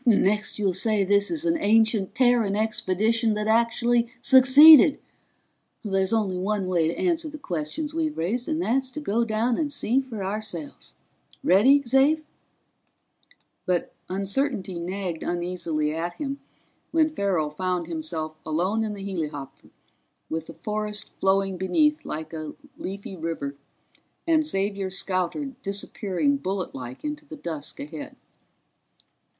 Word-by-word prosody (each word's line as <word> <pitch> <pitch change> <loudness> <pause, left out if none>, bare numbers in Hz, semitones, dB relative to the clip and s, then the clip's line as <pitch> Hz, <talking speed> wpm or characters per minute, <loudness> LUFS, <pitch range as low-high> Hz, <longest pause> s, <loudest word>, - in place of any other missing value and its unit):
"Next 210 -3 +2
you'll 200 -3 +1
say 210 +2 +2
this 200 +1 +3
is 330 0 -1
an 330 -1 +1
ancient 220 -3 +2
Terran 240 -5 +3
expedition 220 +1 +1
that 210 0 -2
actually 235 +1 +2
succeeded! 265 +3 +8 0.9
There's 195 -2 0
only 205 -5 0
one 200 +1 -1
way 175 -3 +1
to 165 - -3
answer 335 -3 0
the 305 - -8
questions 185 - -4
we've 315 -2 -2
raised, 230 - -2
and 315 0 -1
that's 265 -4 0
to - - -4
go 235 -5 0
down 230 +2 0
and 300 -3 -1
see 265 -1 +1
for 230 -7 -7
ourselves. 190 -6 -5 0.5
Ready, 225 +11 +5
Xav?" 275 +5 +3 1.4
But 180 -2 0 0.2
uncertainty 195 -1 -2
nagged 180 -1 -4
uneasily 175 -3 -2
at 170 +2 -3
him 280 - -5 0.5
when 315 -1 +2
Farrell 185 - 0
found 180 +2 -2
himself 160 -1 -4
alone 180 +8 0
in 215 -1 -3
the 200 -1 -7
helihopper 150 -8 -6 0.6
with 160 0 -3
the 165 - -9
forest 210 +4 -4
flowing 195 0 +1
beneath 300 - +1
like 155 +1 -6
a 155 -2 -6 0.2
leafy 195 0 -7
river 160 -4 -4 0.7
and 315 -2 +2
Xavier's 195 -4 -1
scouter 190 - -2
disappearing 200 +6 -1
bulletlike 170 - -5
into 300 0 -4
the 310 +1 -10
dusk 160 - -6
ahead. 150 +1 -7
200 Hz, 135 wpm, -25 LUFS, 180-250 Hz, 1.4 s, succeeded